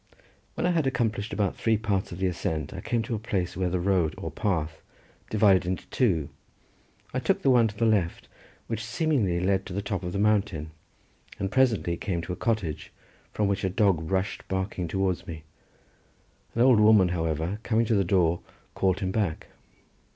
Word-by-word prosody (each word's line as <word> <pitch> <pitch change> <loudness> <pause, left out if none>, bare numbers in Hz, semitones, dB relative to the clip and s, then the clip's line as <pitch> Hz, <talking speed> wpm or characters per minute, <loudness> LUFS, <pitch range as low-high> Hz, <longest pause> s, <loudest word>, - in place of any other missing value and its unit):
When - - -1
I - - +3
had 160 -5 +1
accomplished 110 -5 -1
about 100 -1 0
three 110 -1 +1
parts 100 -3 -1
of 85 - -6
the 95 - -1
ascent 80 -4 -2
I 95 - -6
came 115 +1 -1
to 120 - -4
a 110 - -1
place 100 -5 -2
where 90 0 0
the 90 +1 -1
road, 90 -4 +1
or - - -5
path, 85 -7 -2 0.5
divided 100 -3 +4
into 90 0 -2
two. 90 - +1 0.8
I - - 0
took - - 0
the 135 - +5
one 120 -3 +5
to 105 -1 -8
the 115 - +2
left, 100 -7 +1 0.4
which 110 -1 -4
seemingly 115 - 0
led 95 +1 +1
to - - -7
the 100 - -2
top 100 -1 -2
of 90 -1 -4
the 100 - -3
mountain, 100 -7 +1 0.7
and 95 -1 -3
presently 110 -10 +2
came 85 -4 -2
to 90 - -4
a - - -4
cottage 110 -10 -2 0.4
from 105 - 0
which 100 -1 -1
a 95 - +1
dog 95 -5 +1
rushed 95 +1 -2
barking 95 -2 -2
towards 95 +1 -1
me; 80 -2 -7 1.1
an 115 - +1
old 125 -4 +6
woman, 105 -4 +6
however, 80 +3 -2
coming 115 0 +1
to 115 - +1
the 100 -2 +3
door, 85 -2 +2 0.3
called 95 +1 +1
him 95 -1 -1
back. 95 -6 -2
95 Hz, 190 wpm, -27 LUFS, 90-110 Hz, 1.1 s, old